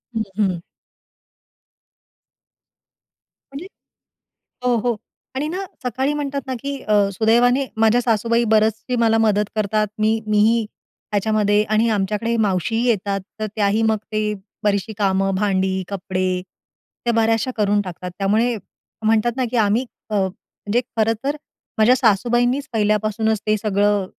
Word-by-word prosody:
हं, 225 - 0 0.2
हं. 190 -5 +1 2.9
म्हणजे 305 +7 -7 1.0
हो, 250 -1 +3
हो. 235 0 0 0.4
आणि 285 +3 -2
ना 370 +4 -3 0.2
सकाळी 260 +4 0
म्हणतात 280 -1 -2
ना 260 - -3
की 280 0 -3
अ, 215 - -2 0.2
सुदैवाने 240 +6 +3
माझ्या 225 +2 +4
सासूबाई 230 0 +1
बऱ्याचशी 220 +3 +2
मला 225 -1 +3
मदत 210 -2 +2
करतात. 215 0 +1
मी 220 +1 +2
मीही 215 +2 +3 0.5
त्याच्यामध्ये 210 0 +2
आणि 215 +2 +2
आमच्याकडे 210 +3 0
मावशीही 220 +2 0
येतात. 200 -3 0 0.2
तर 215 - 0
त्याही 210 +1 +2
मग 220 -1 +3 0.2
ते 215 0 0 0.3
बरीचशी 205 +1 0
कामं 195 -1 +1
भांडी, 190 -1 0
कपडे 185 -2 -2 0.6
त्या 240 - +2
बऱ्याचशा 225 +2 +2
करून 205 -1 +2
टाकतात. 180 -1 -7
त्यामुळे 220 +5 +2 0.5
म्हणतात 225 +2 +3
ना 260 - 0
की 250 - -2
आम्ही 220 +3 +2 0.2
अ, - - -2
म्हणजे 205 +3 -2 0.2
खरंतर 225 +6 0 0.4
माझ्या 220 +3 +6
सासूबाईंनीच 245 +4 +2
पहिल्यापासूनच 215 0 +1
ते 215 0 +3
सगळं 205 -1 +1
215 Hz, 125 wpm, -21 LUFS, 205-235 Hz, 2.9 s, माझ्या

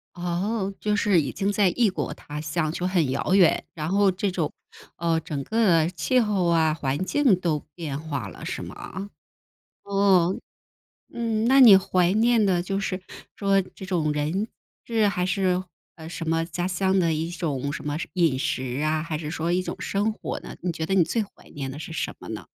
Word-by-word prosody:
哦， 190 +4 -2
就 210 0 0
是 200 -3 +3
已 140 - -3
经 200 0 -1
在 200 -2 +3
异 230 +3 +2
国 190 - -3
他 150 0 -8
乡 155 +1 -1
就 175 +2 -3
很 175 -7 +1
遥 140 +7 0
远， 190 -4 +4
然 155 -1 -4
后 200 +1 +4
这 190 +2 -1
种 175 -5 -2 0.4
呃， 165 -1 +1
整 150 -3 -4
个 175 -4 +3
气 180 - +1
候 210 -6 +1
啊， 160 -2 +3
环 145 +1 -2
境 245 -3 +3
都 165 -4 0
变 150 -5 -4
化 145 -8 -4
了 - - -10
是 - - -4
吗？ 195 +2 -7 0.7
哦， 195 -3 +3 0.8
嗯， 230 -2 -1
那 265 +3 +6
你 225 -7 +10
怀 185 -2 +2
念 225 +1 +3
的 180 -3 +2
就 195 +2 -2
是 195 -2 -2 0.3
说 195 -1 +2
这 190 +1 -11
种 165 -5 0
人、 155 +8 -1 0.4
事， 220 -3 +2
还 180 -3 0
是 185 0 +1 0.5
什 165 -2 -5
么 165 0 +1
家 175 +2 -3
乡 190 +1 +1
的 165 -3 +2
一 160 +2 -2
种 145 -5 -2
什 - - -5
么 145 0 -1 0.2
饮 165 -8 +2
食 130 0 -2
啊， 155 0 +1
还 160 -1 -3
是 150 -1 -5
说 165 0 -2
一 180 +1 +1
种 - - -4
生 205 +2 0
活 - - -5
呢， - - -9
你 180 - -1
觉 160 -1 -3
得 190 - 0
你 190 - +5
最 225 +7 0
怀 205 - -13
念 135 -2 -4
的 135 - -7
是 160 - -7
什 - - -2
么 - - -11
呢？ - - -6
180 Hz, 215 characters per minute, -25 LUFS, 160-200 Hz, 0.8 s, 你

